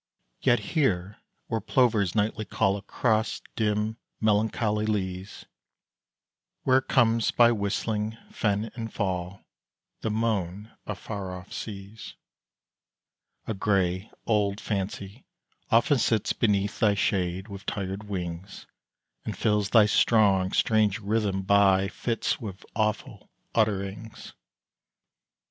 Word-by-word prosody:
Yet 120 -2 +4 0.2
here, 100 - +1 0.3
where 115 -2 -2
plovers 110 -5 +2
nightly 110 +1 0
call 100 -1 +1
Across 110 +2 0
dim, 105 0 0 0.2
melancholy 110 0 +1
leas 95 -2 -3 1.2
Where 130 0 +4
comes 115 -3 +2
by 120 -1 +5
whistling 105 +1 -1
fen 105 +1 -1
and 115 -2 -6
fall 95 -1 -3 0.5
The - - -2
moan 105 -2 -1 0.2
of 105 - -4
far 100 -4 -5
off 90 +2 -12
seas 100 +1 -7 1.3
A 110 - -2
grey, 95 -1 0 0.2
old 105 -2 +1
Fancy 100 +2 -4 0.5
often 120 +4 +4
sits 110 -2 +1
Beneath 100 -3 0
thy 105 -2 +4
shade 95 -1 0
with 100 -2 -9
tired 95 +1 -3
wings, 90 -1 -6 0.6
And - - -5
fills 105 -2 +1
thy 110 -2 +6
strong, 100 -3 +3
strange 110 -2 +2
rhyme 100 -2 -1
by 95 -1 +4
fits 115 +2 -2
With 100 -4 -7
awful 110 -1 -2 0.2
utterings. 105 0 -2
105 Hz, 110 wpm, -27 LUFS, 95-110 Hz, 1.3 s, thy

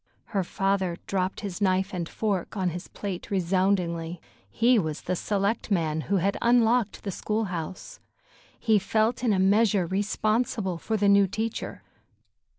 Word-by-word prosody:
Her 195 -2 +1
father 190 -1 0
dropped 190 -1 -1
his 200 -1 -5
knife 190 0 +1
and 170 -2 -3
fork 205 -2 -2
on 185 -2 +1
his 175 +3 -7
plate 195 -3 -6
resoundingly. 180 -3 0 0.3
He 240 +1 +3
was 160 -4 -3
the 185 - -2
selectman 195 -5 0
who 200 - +3
had 195 +2 0
unlocked 235 -2 +3
the 200 - -3
school 215 +4 -1
house. 165 +2 -6 0.6
He 220 -2 +3
felt 220 +5 0
in 235 - +3
a 200 - +2
measure 200 0 +3
responsible 205 0 0
for 220 +4 -1
the 205 0 +2
new 200 0 +6
teacher. 220 +4 -4
195 Hz, 150 wpm, -26 LUFS, 180-215 Hz, 0.6 s, new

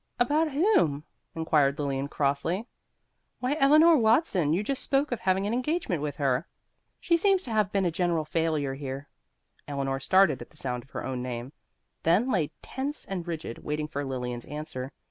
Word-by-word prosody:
"About 300 +6 +3
whom?" 285 - +3 0.3
inquired 150 -4 +2
Lilian 140 -1 -1
crossly. 145 +9 -1 0.7
"Why, 255 +3 0
Eleanor 305 +4 +7
Watson; 220 - +3
you 180 +6 +1
just 275 +5 -1
spoke 275 +1 +1
of 245 - -1
having 190 +1 +1
an 210 - -1
engagement 250 - -1
with 145 -2 -3
her. 135 +1 0 0.5
She 340 - +2
seems 385 +2 +3
to 235 - -7
have 215 -3 +1
been 195 -2 +1
a 175 - +1
general 170 -2 0
failure 155 -3 0
here." 135 0 -6 0.6
Eleanor 135 -1 -2
started 190 +8 +4
at - - -9
the 155 - -17
sound 125 -3 -3
of 130 - -22
her - - -5
own 130 -1 -3
name, 125 +2 -5 0.5
then 200 +11 +3
lay 170 -9 +1
tense 275 +3 -4
and 180 -3 -5
rigid, 160 -8 -5
waiting 150 0 -3
for 145 -1 -4
Lilian's 125 -3 -4
answer. 145 -3 -6
165 Hz, 175 wpm, -28 LUFS, -, 0.7 s, Eleanor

